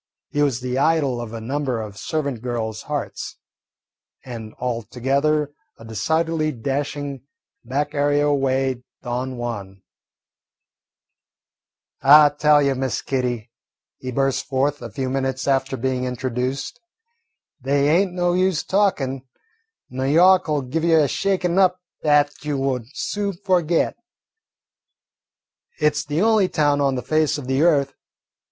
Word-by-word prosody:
He 145 - 0
was 135 -4 +1
the 125 +1 -2
idol 140 -5 +2
of 115 -2 -7
a 115 - -6
number 130 +1 -2
of 105 -2 -6
servant 140 +3 -3
girls' 115 -3 -3
hearts, 145 -2 -4 0.9
and 115 -4 -8
altogether 130 +5 0 0.3
a 115 - -13
decidedly 160 +8 0
dashing 140 +1 -3 0.4
back 145 +3 -2
area 145 0 +2
way 135 -2 0 0.2
Don 125 +1 -3
Juan. 100 -5 -6 2.2
"I 145 +2 +8
tell 150 0 +4
you, 140 -1 +2
Miss 130 -1 -2
Kitty," 125 -4 -2 0.5
he 130 - -5
burst 135 +1 0
forth, 140 +2 0
a 120 - -6
few 130 +5 -3
minutes 130 0 -2
after 135 -1 +1
being 130 +1 -1
introduced, 130 - -3 0.8
"they 140 +2 +2
ain't 180 +4 +3
no 175 -1 +1
use 185 -2 +1
talkin', 150 -10 0 0.7
N' 130 +1 -2
Yawk 180 +3 +5
'll 150 -2 +1
give 150 +6 -3
you 165 -1 +4
a 150 - +3
shakin' 185 +1 0
up 185 -1 +3 0.2
'at 145 -1 +2
you 150 -1 -2
won't 130 -4 -1
soon 205 -1 -2
forget. 175 -3 +2 1.8
It 150 - +3
's - - -1
the 150 +5 0
only 215 -4 +3
town 145 -1 +2
on 135 -1 +2
the 125 - -3
face 155 -1 +1
of 145 - -7
the 135 +2 0
earth. 145 -5 +3
140 Hz, 135 wpm, -22 LUFS, 125-155 Hz, 2.2 s, I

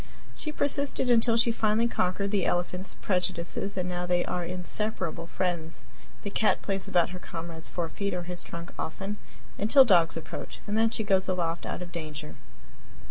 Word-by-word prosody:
She 305 - -5
persisted 280 -3 +2
until 230 0 +5
she 235 0 +4
finally 225 0 +2
conquered 200 -2 0
the 200 -3 +2
elephant's 180 +2 -1
prejudices, 185 +1 -1
and 180 -1 0
now 180 0 -2
they 180 0 +2
are 180 - -2
inseparable 180 -1 -2
friends. 170 -3 -2 0.4
The 200 - -4
cat 215 - +2
plays 195 -2 -2
about 175 -1 +3
her 180 - -6
comrade's 165 -2 -7
forefeet 180 +3 -2
or 175 - -2
his 175 0 -4
trunk 170 0 -7
often, 195 +6 -3 0.4
until 260 +6 +7
dogs 170 -7 +4
approach, 160 - -7
and 210 - -2
then 225 +1 +4
she 225 -1 -1
goes 190 -2 +2
aloft 175 -3 -1
out - - -3
of 175 - -10
danger. 155 -2 -6
180 Hz, 170 wpm, -28 LUFS, 170-210 Hz, 0.4 s, until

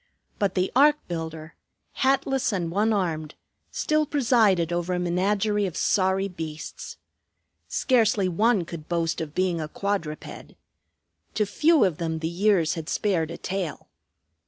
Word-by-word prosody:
But 200 -3 0
the 185 0 0
ark 295 +3 +6
builder, 160 -2 -6 0.4
hatless 270 -1 +1
and 175 -5 -2
one 210 +5 +2
armed, 160 -7 -2 0.3
still 305 -1 0
presided 220 - +2
over 175 +1 -1
a - - -1
menagerie 200 +4 +1
of 180 - -6
sorry 190 0 +2
beasts. 160 -4 -7 0.7
Scarcely 220 -6 +2
one 205 +1 +2
could 160 -2 -9
boast 165 -2 -1
of 155 -2 -6
being 180 -3 0
a 155 - -3
quadruped. 170 -3 -4 0.8
To 210 - +2
few 305 +7 +3
of 175 -5 -1
them 165 -1 -2
the 160 0 -3
years 175 -1 +2
had 160 -1 -6
spared 175 -7 0
a 170 - -6
tail. 185 -4 -4
185 Hz, 140 wpm, -25 LUFS, 165-210 Hz, 0.8 s, ark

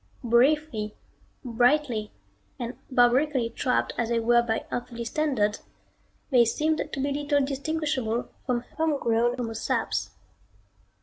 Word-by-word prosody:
Briefly, 240 -2 +2 0.5
brightly 245 -2 +1 0.5
and 240 0 -5
barbarically 250 0 +3
trapped 250 +2 0
as 235 -1 0
they 235 -1 +2
were 240 +1 +4
by 225 -2 -2
earthly 240 -1 -4
standards, 235 -6 0 0.7
they 245 -3 +6
seemed 310 +7 0
to - - -4
be 280 +1 0
little 290 -1 +1
distinguishable 275 -4 -2 0.2
from 245 -2 +1 0.2
homegrown 240 -6 +1
homo 230 -2 -3
saps. - - -1
245 Hz, 115 wpm, -26 LUFS, 230-285 Hz, 0.7 s, they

